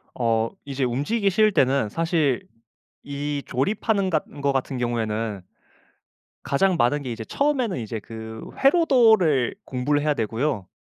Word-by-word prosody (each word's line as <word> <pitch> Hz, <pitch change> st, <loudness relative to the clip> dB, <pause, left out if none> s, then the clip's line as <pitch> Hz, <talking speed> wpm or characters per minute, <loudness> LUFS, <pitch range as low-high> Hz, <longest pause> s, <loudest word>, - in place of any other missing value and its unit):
어 115 Hz, -2 st, +1 dB
이제 140 Hz, -1 st, -3 dB
움직이기 145 Hz, -, 0 dB
싫을 215 Hz, +3 st, +4 dB
때는 135 Hz, -, +2 dB
사실 160 Hz, -, 0 dB, 0.6 s
이 145 Hz, 0 st, -3 dB
조립하는 200 Hz, -, 0 dB
같 155 Hz, -3 st, +1 dB
은거 140 Hz, -1 st, -2 dB
같은 135 Hz, 0 st, -2 dB
경우에는 115 Hz, -3 st, -2 dB, 1.0 s
가장 185 Hz, +6 st, +2 dB
많은 145 Hz, +2 st, +2 dB
게 130 Hz, -, -5 dB
이제 115 Hz, -1 st, -5 dB
처음에는 265 Hz, -, 0 dB
이제 110 Hz, 0 st, -4 dB
그 110 Hz, +1 st, -8 dB, 0.2 s
회로도를 225 Hz, -, +4 dB
공부를 140 Hz, +3 st, 0 dB
해야 150 Hz, 0 st, +1 dB
되고요. 115 Hz, -, -2 dB
140 Hz, 295 characters per minute, -24 LUFS, 120-185 Hz, 1.0 s, 싫을